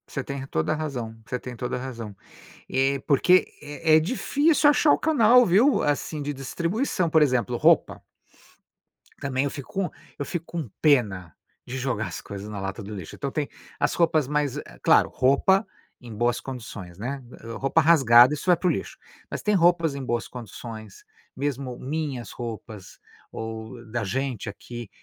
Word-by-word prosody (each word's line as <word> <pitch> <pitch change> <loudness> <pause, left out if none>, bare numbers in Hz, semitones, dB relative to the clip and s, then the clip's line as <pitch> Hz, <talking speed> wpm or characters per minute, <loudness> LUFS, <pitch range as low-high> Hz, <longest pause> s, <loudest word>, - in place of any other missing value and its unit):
Você 135 - -4
tem 140 +1 -5
re 135 - -7
toda 80 - 0
razão 130 -8 -4
você 125 - -3
tem 125 -1 -8
toda 125 +1 -3
razão. 120 -5 -7 0.5
E, 135 +1 +1
porque 180 +5 +4
é 150 +2 +2
é - - +5
difícil 285 - +2
achar 295 0 +4
o - - +3
canal, 250 -5 +5
viu? 230 +10 +4
Assim 150 +1 -1
de 145 +1 -3
distribuição, 170 - -1
por 160 0 +4
exemplo 125 -4 +2
roupa. - - +3 1.2
Também 135 0 0
eu 140 - -2
fico 140 -4 -9
com 195 -2 -1 0.3
eu 145 - -2
fico 175 +1 -4
com 165 -8 -5
pena 100 - +2 0.3
de 130 - -5
jogar 125 -4 -2
as - - -6
coisas 100 +1 -8
na 105 -2 -5
lata 95 +3 -5
do 105 +2 -7
lixo. 90 -5 -8
Então 140 -1 -4
tem 150 0 -2 0.3
as - - +1
roupas 160 -5 +2
mais 145 -2 0
eh - - -9
claro, - - +5
roupa 165 - +3 0.4
em 120 -2 -9
boas 120 +2 0
condições, 110 -9 -8
né. 130 +6 -5 0.4
Roupa 135 +4 +2
rasgada, 135 -5 +7
isso 150 - -6
vai 180 -1 +5
para 185 - -1
o - - +4
lixo, - - -5 0.3
mas - - -5
tem 210 - +2
roupas 170 -3 +3
em 140 - -5
boas 120 -2 -2
condições, 110 -3 -9 0.3
mesmo 135 -2 -3
minhas 140 -3 -4
roupas 110 -4 -8 0.3
ou 110 +2 -7
da 120 -1 -1
gente 125 +1 -3
aqui, 120 +2 -9
135 Hz, 175 wpm, -25 LUFS, 120-155 Hz, 1.2 s, rasgada